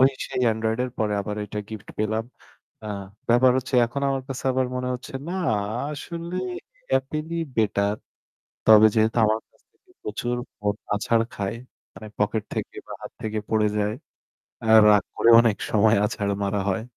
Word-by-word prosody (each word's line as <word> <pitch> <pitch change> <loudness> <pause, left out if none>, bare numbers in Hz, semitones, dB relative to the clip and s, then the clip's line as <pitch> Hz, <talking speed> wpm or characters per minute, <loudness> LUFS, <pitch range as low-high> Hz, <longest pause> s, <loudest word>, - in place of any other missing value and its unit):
ওই 135 +1 +7 0.2
সেই - - -3
Android 110 +1 -1
এর 125 - -5
পরে 105 -1 0
আবার 105 +1 -4
এইটা 105 +1 -6
গিফট 110 -3 -9
পেলাম। 110 +1 0 0.6
আ - - -5 0.4
ব্যাপার 120 +2 +5
হচ্ছে 130 +1 -5
এখন 140 +4 -5
আমার 135 -1 -1
কাছে 135 -1 -6
আবার 130 0 +1
মনে 125 0 -2
হচ্ছে 125 +2 -8 0.2
না - - -3 0.6
আসলে 170 +4 -6 0.6
Apple 150 +4 -5
ই - - 0 0.2
বেটার। 100 -1 +1 0.7
তবে 110 0 +8
যেহেতু 110 +2 +2
আমার 110 +1 +1
কাছ - - -32
থেকে - - -29
প্রচুর 120 +3 -2 0.2
ফোন 105 0 -1 0.2
আছাড় 115 +2 +2
খায়, 100 +2 -3 0.4
মানে 110 - -10
পকেট 105 +1 0
থেকে - - -4
বা - - -7
হাত - - -8
থেকে 110 0 -2
পড়ে 110 -1 +3
যায়। 105 0 0 0.7
অ্যা 110 - +2 0.2
রাগ 105 -2 +5
করেও 115 0 +6
অনেক 115 -4 +1
সময় 110 +1 +4
অনেক - - +5
সময় 100 - +3
আছাড় 100 -1 -2
মারা 100 0 0
হয়। 100 +3 -1
110 Hz, 175 wpm, -24 LUFS, 105-125 Hz, 0.7 s, তবে